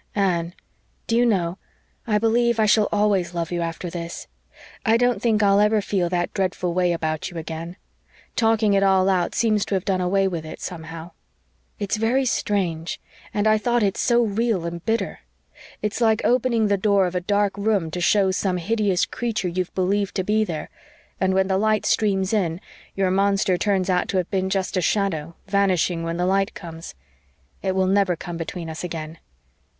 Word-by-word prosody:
"Anne, 175 -3 0 0.5
do 230 - 0
you 240 +1 +4
know, 185 -4 0 0.5
I 210 -2 +2
believe 230 +1 +2
I 215 - +4
shall 210 0 +3
always 200 -4 +1
love 170 -1 -2
you 175 -1 -1
after 165 +1 -4
this. 170 0 -6 0.6
I 225 -1 +4
don't 245 -4 +1
think 220 -3 +2
I'll 200 0 +4
ever 210 +1 +4
feel 190 -3 -1
that 175 -1 -1
dreadful 185 -2 -1
way 180 0 +2
about 160 -2 -2
you 175 - -9
again. 165 +2 -6 0.6
Talking 225 -2 +3
it 195 - +3
all 190 -1 +4
out 180 -2 0
seems 215 -3 +2
to 200 - -1
have 190 0 -2
done 185 -2 0
away 195 +2 +2
with 170 -4 -3
it, 155 - -9
somehow. 165 0 -7 0.7
It's 205 +1 -2
very 240 +5 +1
strange 180 -8 -1 0.3
and 205 0 -1
I 215 0 +4
thought 240 0 +1
it 195 -1 +1
so 240 -1 +3
real 215 -4 0
and 170 0 -5
bitter. 225 +1 -1 0.6
It's 210 +3 -2
like 220 -1 +3
opening 240 -2 +2
the 205 -1 +2
door 200 -1 +3
of 180 - -3
a 180 - -1
dark 205 +1 +1
room 200 -5 0
to 180 - -4
show 195 +1 +3
some 185 -1 0
hideous 200 0 +1
creature 225 -6 -2
you've 180 +1 -3
believed 195 +2 0
to 190 - 0
be 215 +3 +2
there 165 -7 -5 0.5
and 190 0 +1
when 190 0 +2
the 190 0 +1
light 215 0 +1
streams 195 -2 +1
in 175 -5 0 0.4
your 190 -1 +1
monster 195 -1 +2
turns 190 +1 0
out 180 -2 +1
to 190 - -1
have 180 -2 -1
been 190 -1 0
just 190 -1 -1
a 185 - +1
shadow, 170 -5 -1
vanishing 190 -4 +1
when 165 0 -3
the 180 - 0
light 195 +1 +1
comes. 165 -2 -9 0.7
It 190 -1 -1
will 190 0 +2
never 190 -1 +2
come 170 +1 -7
between 165 0 -5
us 160 +1 -6
again." 160 -2 -6
190 Hz, 190 wpm, -23 LUFS, 175-210 Hz, 0.7 s, you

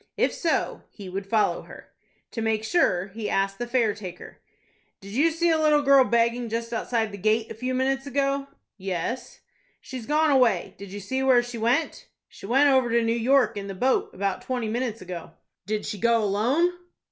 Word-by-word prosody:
If - - +2
so, 330 -2 -1
he 200 -3 -10
would 195 +2 -5
follow 215 +1 +1
her. - - -14 0.4
To 225 - -4
make 220 -1 0
sure, 200 - +1
he 215 +1 -5
asked 195 +1 0
the 240 - -3
fare 240 -4 +2
taker. 185 -4 -10 0.6
"Did 200 0 -11
you 285 +9 +3
see 335 +1 +1
a 320 - +2
little 300 -1 +3
girl 275 -1 +6
begging 235 0 +1
just 230 +1 -3
outside 225 -1 -1
the 200 - -8
gate 220 +3 +1
a - - -3
few 255 +3 -3
minutes 270 +1 0
ago?" 275 0 0 0.3
"Yes." 195 +7 -4 0.4
"She's 255 -4 -8
gone 305 +1 +3
away. 245 -9 +2
Did 200 -1 -9
you 205 - -6
see 260 +7 -3
where 255 -2 +4
she 240 -1 -7
went?" 240 +8 0 0.2
"She - - -12
went 270 +6 +4
over 260 -2 +3
to 235 0 +2
New 230 0 +1
York 250 +3 +3
in 200 -1 -5
the 195 - -6
boat, 255 +7 +1
about 195 0 -2
twenty 250 -3 -3
minutes 230 -2 -3
ago." 175 -2 -8 0.3
"Did 215 0 -2
she 210 -1 -5
go 230 0 +3
alone?" 240 - +2
235 Hz, 195 wpm, -25 LUFS, 205-265 Hz, 0.6 s, girl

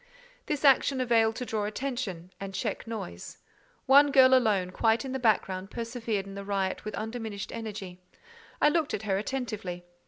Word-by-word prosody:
This 300 -1 -1
action 275 0 +5
availed 225 -3 +3
to 250 - -4
draw 215 -3 -2
attention 210 -6 -4
and 195 -1 -6
check 220 0 -3
noise. 200 - -7 0.5
One 285 +2 +6
girl 260 -1 +7
alone, 210 -8 +3
quite 225 +6 +1
in 265 - -4
the 265 - -2
background, 195 -5 +1
persevered 230 -3 -3
in 195 - -9
the 200 0 -6
riot 195 -1 -2
with 215 -1 -5
undiminished 220 -2 -5
energy. 200 -5 -7 0.6
I 295 - +5
looked 310 -1 0
at 205 - -6
her 195 -2 0
attentively. 210 -7 -4
220 Hz, 165 wpm, -28 LUFS, 195-255 Hz, 0.6 s, girl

